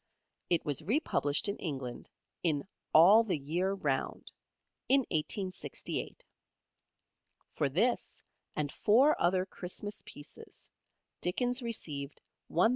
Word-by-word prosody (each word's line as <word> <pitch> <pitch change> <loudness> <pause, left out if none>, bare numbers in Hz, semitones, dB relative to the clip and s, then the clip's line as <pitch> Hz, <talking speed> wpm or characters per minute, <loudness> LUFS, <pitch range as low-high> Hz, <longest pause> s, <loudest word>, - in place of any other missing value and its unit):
It 170 - +2
was 145 0 -1
republished 170 - +1
in 200 - -2
England 130 -7 -5 0.3
in 155 -2 0 0.2
"All 195 +8 +8
the 200 -7 -1
Year 170 +7 -1
Round" 145 -9 -2 0.6
in 275 +1 +6
1868. 185 - -2 1.3
For 145 -3 0
this 220 - 0 0.3
and 145 -2 -1
four 260 +9 +4
other 185 +1 +3
Christmas 195 +2 -6
pieces 145 - -11 0.5
Dickens 245 +8 +1
received 150 - -4 0.3
£1,000. 180 +7 +4
180 Hz, 105 wpm, -32 LUFS, 150-215 Hz, 1.3 s, All